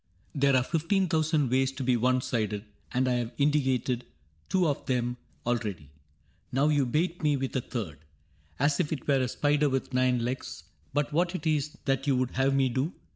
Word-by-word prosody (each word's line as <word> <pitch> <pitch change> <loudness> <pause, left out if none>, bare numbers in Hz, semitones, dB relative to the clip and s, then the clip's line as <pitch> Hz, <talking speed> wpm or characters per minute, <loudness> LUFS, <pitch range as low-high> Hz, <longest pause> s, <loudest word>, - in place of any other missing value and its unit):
There 140 -1 +3
are 130 - +4
fifteen 175 +6 +1
thousand 155 -5 +1
ways 130 +1 +2
to 135 0 -5
be 125 -1 +3
one 125 +2 +2
sided. 105 -4 -2 0.3
And 130 +1 +1
I 125 - +2
have 120 0 -3
indicated 130 -4 +1 0.5
two 185 -3 +3
of 145 - -1
them 125 -1 0 0.3
Already. 105 - -2 0.6
Now 140 +4 +3
you 145 -3 +2
bait 170 +7 0
me 150 -2 +2
with 135 0 -3
a 130 - +1
third 100 - -5 0.3
— 75 +1 -35
As 145 0 +2
if 165 -5 0
it 155 - -4
were 140 -2 +3
a 130 - +1
spider 145 +3 +2
with 135 0 -2
nine 125 -2 +2
legs; 120 -7 -4 0.3
But 145 +1 -1
what 175 +3 +1
it 170 - -5
is 150 -2 0
that 135 +1 0
you 135 - +4
would 125 -1 0
have 135 +1 +2
me 135 -1 +3
do. 130 +8 -1
135 Hz, 200 wpm, -28 LUFS, 125-150 Hz, 0.6 s, are